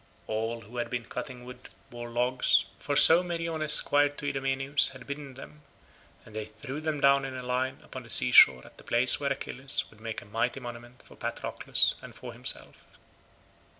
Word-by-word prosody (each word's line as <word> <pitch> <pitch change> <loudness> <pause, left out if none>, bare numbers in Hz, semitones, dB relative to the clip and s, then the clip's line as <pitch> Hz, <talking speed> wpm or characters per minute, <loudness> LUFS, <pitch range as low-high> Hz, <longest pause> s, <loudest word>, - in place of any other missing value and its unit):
All 115 +2 -4
who 115 +3 -12
had 120 -1 -3
been 120 -1 -4
cutting 125 +1 -8
wood 125 0 -12 0.2
bore 120 0 -8
logs, 125 -2 +1
for 145 - -3
so 165 +4 +9
Meriones 165 -3 -2
squire 145 -1 +5
to 145 0 -8
Idomeneus 135 0 0
had 130 -1 -12
bidden 140 -2 -8
them, 150 +3 -13 0.6
and 110 - -15
they 110 -1 -4
threw 130 +7 -8
them 155 -2 -3
down 140 0 +3
in 135 -1 -6
a 125 - -7
line 125 +1 -2
upon - - -10
the - - -16
sea - - +3
shore 65 -1 +7
at - - -18
the - - -14
place 120 +2 +1
where 140 -1 -2
Achilles 135 0 -1
would 110 - -20
make 115 -1 -5
a - - -18
mighty 115 +5 -2
monument 120 0 -11
for - - -16
Patroclus - - -1
and - - -12
for - - -10
himself. - - -3
130 Hz, 190 wpm, -28 LUFS, 120-140 Hz, 0.6 s, so